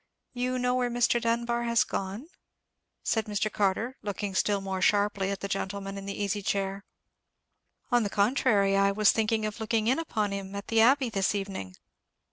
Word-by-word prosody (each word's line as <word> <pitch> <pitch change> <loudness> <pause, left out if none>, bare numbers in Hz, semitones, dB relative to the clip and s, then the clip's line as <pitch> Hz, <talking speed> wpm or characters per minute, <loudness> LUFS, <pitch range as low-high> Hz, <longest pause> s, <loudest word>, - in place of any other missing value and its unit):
"You 250 +1 -1
know 250 0 +1
where 250 -1 +1
Mr. 240 0 +2
Dunbar 235 +1 0
has 235 -2 +3
gone?" 200 +8 -4 0.8
said 220 -1 0
Mr. 210 0 -1
Carter, 210 +6 0
looking 205 -1 -4
still 200 +1 +1
more 190 -1 -4
sharply 200 0 +2
at 200 -1 -4
the 200 - -3
gentleman 195 0 -4
in 195 0 -7
the 200 - -5
easy 205 +1 -1
chair. 195 0 -2 1.1
"On 240 0 +4
the 205 - -1
contrary, 205 -2 +2
I 200 0 +4
was 210 +1 +4
thinking 220 0 0
of 215 +2 -4
looking 220 0 0
in 255 +6 +2
upon 215 -11 -1
him 195 0 -5
at 200 0 -6
the 225 -1 +4
Abbey 260 +2 +4
this 195 0 0
evening." 195 - -5
210 Hz, 180 wpm, -28 LUFS, 195-235 Hz, 1.1 s, On